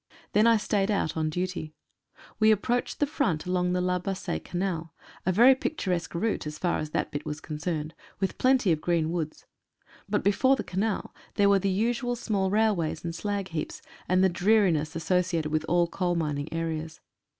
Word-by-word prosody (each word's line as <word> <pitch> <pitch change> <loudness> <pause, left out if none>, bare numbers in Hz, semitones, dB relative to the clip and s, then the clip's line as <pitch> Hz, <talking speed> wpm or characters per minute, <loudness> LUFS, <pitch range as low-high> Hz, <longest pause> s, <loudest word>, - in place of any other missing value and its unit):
Then 215 +2 +5
I 230 -1 +6
stayed 205 -1 0
out 195 -6 0
on 155 -1 0
duty. 175 -2 -4 0.6
We 215 0 +6
ap 210 -2 +2
proached 245 0 -1
the 290 - +2
front 275 - -1
along 180 0 0
the 180 - +1
La 180 0 +1
Bassee 195 +1 -3
Canal 175 -3 -3
— - - -23
a - - +4
very 240 +8 +7
picturesque 185 - -2
route 205 -2 -1
as 150 0 -6
far 175 +1 0
as 155 - -4
that - - -2
bit 145 +1 -4
was 150 -1 -5
concerned, 155 0 -4 0.3
with 190 -1 -2
plenty 255 -7 +4
of 155 -2 +1
green 165 -2 +1
woods. 160 -3 -4 0.6
But 210 - 0
before 260 +7 +4
the - - -4
Canal 200 +3 -2 0.2
there 200 0 +4
were 200 -1 +5
the 195 - 0
usual 240 +5 0
small 205 -5 -1
railways 200 -7 +1
and 165 - -3
slagheaps, 195 -4 -3 0.3
and 185 +1 +4
the 190 - +5
dreari 200 +1 +4
ness 155 0 -2
associated 170 -2 0
with 155 0 0
all 175 +1 +3
coalmining 165 -5 -1
areas. 160 -1 -3
180 Hz, 185 wpm, -27 LUFS, 160-205 Hz, 0.6 s, very